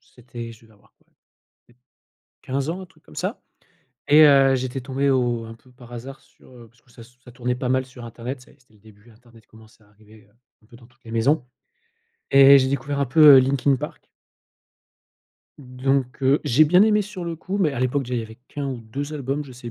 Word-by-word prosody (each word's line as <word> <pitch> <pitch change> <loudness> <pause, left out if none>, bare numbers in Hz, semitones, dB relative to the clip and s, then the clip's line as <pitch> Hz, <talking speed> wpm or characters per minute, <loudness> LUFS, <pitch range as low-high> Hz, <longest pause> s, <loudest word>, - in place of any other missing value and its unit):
c'était 120 -2 -11
je 115 - -19
devais 110 -1 -22
avoir 100 - -27
quoi? - - -37 0.6
Peut - - -25
être 125 - -40 0.6
15 135 +1 -3
ans, 180 +3 -4
un 185 - -9
truc - - -27
comme - - -18
ça - - -4 0.7
et 150 +2 +7
heu, 135 -2 +5
j'étais 130 +1 -4
tombé 135 +2 -1
au 120 -3 0
un 115 - -10
peu 120 +3 -21
par 120 -1 -16
hasard 135 +3 -9
sur, - - -24
heu, 120 -2 -15
parce 115 +1 -30
que 120 - -27
ça 115 - -15
s 120 +2 -18
ça 125 - -13
tournait 125 0 -3
pas 125 0 -4
mal 130 0 0
sur 125 -2 -12
internet, 120 +3 -7
tu 125 - -18
sais? - - -22
C'était 125 -4 -30
le - - -25
début, 110 +2 -20
internet 115 -1 -22
commençait 110 0 -20
à 105 - -27
arriver, 105 0 -21
heu, - - -32 0.3
un - - -24
peu 120 - -17
dans 120 -1 -19
toutes 120 +1 -32
les 115 - -11
maisons 130 +5 +1 0.9
et 135 0 +8
j'ai 130 - 0
découvert 140 +1 -3
un 140 - +1
peu, 145 +2 +7
heu, - - +8
Linkin 135 +1 +1
Park. - - -9 1.5
Donc 130 0 -2
heu, 135 +3 +3
j'ai 145 +7 +4
bien 180 +5 +4
aimé 210 -1 +3
sur 200 -3 -7
le 165 -1 -5
coup, 190 +5 -5
mais 160 -7 +1
à 135 - -5
l'époque 130 +3 0
déjà 125 -1 -5
il 120 - -1
y - - -5
avait 110 +1 -12
qu'1 145 -1 -5
ou 130 -3 -5
2 140 +7 -7
albums, 140 +1 -4
je 135 - -13
sais 120 -1 -10
130 Hz, 240 wpm, -22 LUFS, 120-140 Hz, 1.5 s, et